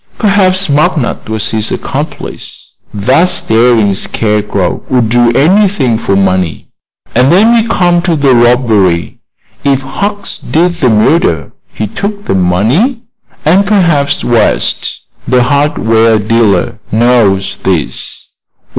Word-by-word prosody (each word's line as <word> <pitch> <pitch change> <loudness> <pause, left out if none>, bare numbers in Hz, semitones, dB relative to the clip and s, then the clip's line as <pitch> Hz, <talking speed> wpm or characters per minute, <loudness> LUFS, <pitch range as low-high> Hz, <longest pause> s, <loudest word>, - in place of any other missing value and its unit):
Perhaps 195 -2 +2
McNutt 150 -5 -1
was 110 +1 -1
his 110 -1 -2
accomplice. - - -6 0.2
That 130 - +1
staring 115 - +2
scarecrow 105 -2 -2
would 125 -4 +1
do 120 0 +3
anything 160 - +2
for 115 -4 -1
money. 95 -5 -1 0.4
And 125 +3 +3
then 215 +7 +4
we 230 -1 +2
come 175 -1 +1
to 170 -1 0
the 140 -3 +2
robbery. 115 -8 +1 0.4
If 140 -1 +1
Hucks 200 +9 -4
did 175 +3 0
the 130 - +3
murder 110 - +1 0.2
he 110 - -4
took 200 - -5
the - - -1
money, 115 - 0 0.4
and 180 +6 +3
perhaps 170 -9 +1
West, 115 -3 0 0.3
the 125 -1 +2
hardware 115 -5 +1
dealer, 110 +1 0
knows 110 -4 +1
this. 90 -6 -2
125 Hz, 120 wpm, -10 LUFS, 110-175 Hz, 0.4 s, then